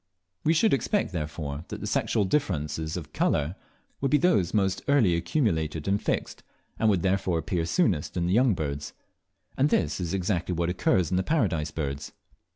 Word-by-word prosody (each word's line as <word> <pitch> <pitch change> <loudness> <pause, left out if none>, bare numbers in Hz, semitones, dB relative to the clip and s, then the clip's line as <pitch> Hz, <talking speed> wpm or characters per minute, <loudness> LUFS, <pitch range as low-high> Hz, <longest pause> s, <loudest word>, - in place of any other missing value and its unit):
We 160 - +3
should 220 +7 +4
expect, 135 - 0
therefore, 75 -2 -4
that - - -6
the - - -5
sexual 105 - +1
differences 80 - -1
of 75 -3 -8
colour 75 +5 +1 0.5
would 135 - +1
be 150 - +5
those 155 - +2
most 95 -3 +1
early 120 -12 +4
accumulated 80 - -1
and 100 +1 +1
fixed, - - -2 0.4
and 110 - +3
would 95 -4 +2
therefore 95 -2 +1
appear 80 +1 -1
soonest 90 - +1
in 85 - +1
the 90 - +1
young 120 -1 +4
birds; 75 -2 -4 0.6
and 140 +3 +3
this 75 - +1
is 90 0 -2
exactly 90 -1 -1
what 85 +1 0
occurs 90 -1 +1
in 90 - +2
the - - +3
Paradise 90 - 0
Birds. 70 -3 -4
90 Hz, 175 wpm, -27 LUFS, 80-105 Hz, 0.6 s, be